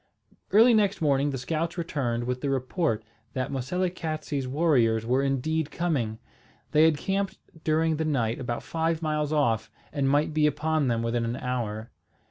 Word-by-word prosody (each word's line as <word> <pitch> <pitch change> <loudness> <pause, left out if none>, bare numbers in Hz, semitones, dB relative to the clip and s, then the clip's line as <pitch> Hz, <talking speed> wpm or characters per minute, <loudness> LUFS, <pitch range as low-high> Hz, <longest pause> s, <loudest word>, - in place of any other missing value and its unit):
Early 230 +4 +6
next 205 -2 +2
morning 145 -2 +2
the 135 - -3
scouts 160 +7 -2
returned 135 -8 -1
with 125 +1 -3
the 140 - -1
report 130 - 0 0.3
that 130 +1 -2
Moselekatse's 155 -1 -2
warriors 125 -7 +2
were 130 +3 +2
indeed 140 +3 0
coming. 140 -12 -1 0.5
They 155 +1 +6
had 160 -2 +4
camped 195 +4 -1 0.3
during 160 0 +2
the 160 - 0
night 120 -7 0
about 120 -2 -3
five 165 0 -1
miles 150 -1 0
off, 115 -8 +1 0.2
and 140 -2 +1
might 145 +2 +2
be 150 -1 +4
upon 150 0 0
them 115 -1 0
within 115 0 0
an 115 +1 -2
hour. 115 -4 -3
145 Hz, 160 wpm, -27 LUFS, 125-160 Hz, 0.5 s, Early